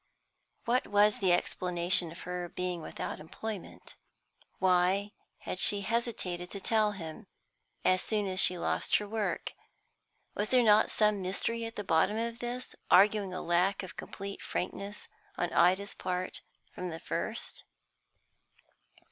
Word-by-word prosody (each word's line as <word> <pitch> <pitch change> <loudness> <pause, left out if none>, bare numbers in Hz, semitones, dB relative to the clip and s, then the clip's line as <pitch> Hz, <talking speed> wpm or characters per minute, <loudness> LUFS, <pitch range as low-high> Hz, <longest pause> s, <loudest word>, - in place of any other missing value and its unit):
What 245 +2 +1
was 205 +1 +4
the 190 -3 +3
explanation 175 -1 +1
of 170 - -10
her 180 -1 -4
being 180 -1 -3
without 155 - -5
employment? 200 +5 -8 0.6
Why 185 +2 +2 0.3
had 185 - -4
she 200 +2 +4
hesitated 200 -5 -2
to 200 - -6
tell 215 +1 +2
him, 175 +2 -8 0.6
as 185 0 +4
soon 210 -2 0
as 185 -1 -2
she 180 - +5
lost - - 0
her 210 - +1
work? 215 0 -2 0.8
Was 205 +1 -2
there 250 -1 +5
not 215 -1 +5
some 210 -2 +2
mystery 230 +5 -1
at 225 - -7
the 205 - -4
bottom 190 +4 +2
of 230 +1 -2
this, 245 +1 -5
arguing 200 0 +5
a 180 - -4
lack 180 +4 +2
of 185 - -8
complete 200 0 -7
frankness 200 +3 -4 0.3
on 175 -1 -1
Ida's 190 +3 +3
part 180 0 -3 0.3
from 180 0 -4
the 165 -1 -6
first? - - -4
195 Hz, 140 wpm, -31 LUFS, 180-210 Hz, 0.8 s, she